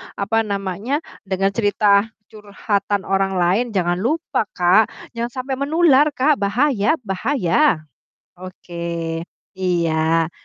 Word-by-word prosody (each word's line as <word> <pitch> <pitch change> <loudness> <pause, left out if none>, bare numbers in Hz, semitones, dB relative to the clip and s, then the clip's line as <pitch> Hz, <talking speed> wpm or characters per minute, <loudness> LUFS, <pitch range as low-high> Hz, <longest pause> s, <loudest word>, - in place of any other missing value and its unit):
apa 225 +2 0
namanya, 200 - -3 0.2
dengan 195 +1 0
cerita 205 0 +2 0.2
curhatan 205 -1 -2
orang 195 0 0
lain 180 +7 +2
jangan 175 -1 +1
lupa 265 - -1
Kak, 185 +5 +4 0.2
jangan 235 0 -3 0.2
sampai 265 0 -4
menular 295 -1 +4
Kak, 290 +2 +2
bahaya 220 +4 +1
bahaya. 195 - +1 0.5
Oke. 185 -1 -12 0.8
Iya. 165 -2 +1
200 Hz, 105 wpm, -20 LUFS, 185-245 Hz, 0.8 s, Kak